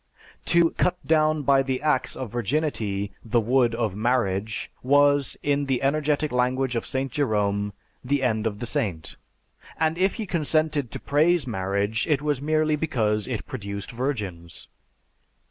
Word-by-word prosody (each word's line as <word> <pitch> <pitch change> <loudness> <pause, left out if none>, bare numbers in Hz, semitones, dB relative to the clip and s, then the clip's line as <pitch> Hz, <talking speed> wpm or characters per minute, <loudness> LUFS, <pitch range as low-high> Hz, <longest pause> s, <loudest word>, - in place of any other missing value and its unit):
To 170 -1 +4
'cut 180 0 0
down 155 -1 +2
by 135 -1 +4
the 130 -1 -2
axe 150 -4 0
of 130 -5 -6
Virginity 115 -5 -1
the 120 +1 +1
wood 120 +1 +2
of 110 -5 -1
Marriage' 110 -2 -1
was, 145 +1 +3
in 145 -1 +1
the 130 -1 0
energetic 150 +1 +1
language 125 +1 0
of 115 - -2
St. 135 0 -2
Jerome, 105 -7 0 0.3
the 140 +1 0
end 110 -3 +1
of 105 -2 -3
the 120 - -5
saint; 90 -8 -3 0.6
and 160 +1 0
if 190 +1 +2
he 225 - -4
consented 155 - 0
to - - -5
praise 155 +2 +2
marriage 100 0 -1
it 150 -3 +1
was 145 -3 0
merely 155 +1 +2
because 110 -9 0
it 125 -4 -4
produced 100 -7 -6
virgins." 105 - -4
130 Hz, 150 wpm, -25 LUFS, 110-150 Hz, 0.6 s, To